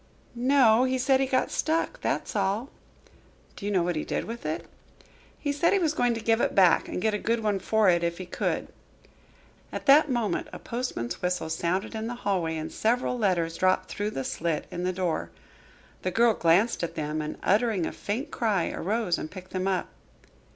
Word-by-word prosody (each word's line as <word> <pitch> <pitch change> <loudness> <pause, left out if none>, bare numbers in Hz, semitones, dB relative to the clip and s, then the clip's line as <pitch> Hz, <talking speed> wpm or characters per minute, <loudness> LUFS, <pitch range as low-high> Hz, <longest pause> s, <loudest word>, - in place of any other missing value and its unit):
"No, 245 -2 +4
he 260 0 +1
said 260 +1 +3
he 270 - +1
got 260 -1 +1
stuck, 330 +10 -1
that's - - -2
all." 205 +6 0 0.8
"Do 200 - -6
you - - -1
know 185 -4 +2
what 175 0 -1
he 155 - -1
did - - -2
with 230 -7 -6
it?" 155 - -3 0.7
"He 290 - -2
said 310 +6 +2
he - - +4
was 325 -5 +1
going 245 -5 +1
to - - -3
give 225 +1 +2
it - - 0
back 185 -4 +5
and - - -4
get 220 -1 +2
a 210 - -1
good 230 +1 0
one 205 -2 +1
for 215 +2 +2
it, 175 -2 +4
if 170 0 -1
he 185 - -6
could." 180 - -2 1.0
At - - -5
that 295 +2 +6
moment 230 -8 -1
a - - -7
postman's 235 - -4
whistle 180 -3 -1
sounded 175 +6 -1
in 220 0 -3
the 245 - -4
hallway 170 -5 0
and 155 - -5
several 245 +3 0
letters 180 -7 0
dropped 185 0 +2
through 205 +1 -2
the 135 -10 -4
slit 160 +2 -2
in 175 +1 -3
the 185 - +1
door. 180 -3 -2 0.7
The 185 - -1
girl 230 +4 +4
glanced 190 +6 +3
at 170 - -3
them, 155 0 -2
and 155 0 -5
uttering 210 -4 +2
a - - -3
faint 225 +7 -4
cry, 210 -7 0
arose 210 -1 -1
and 155 - -5
picked 185 +1 -11
them 185 0 -2
up. 190 -2 0
205 Hz, 205 wpm, -27 LUFS, 175-240 Hz, 1.0 s, that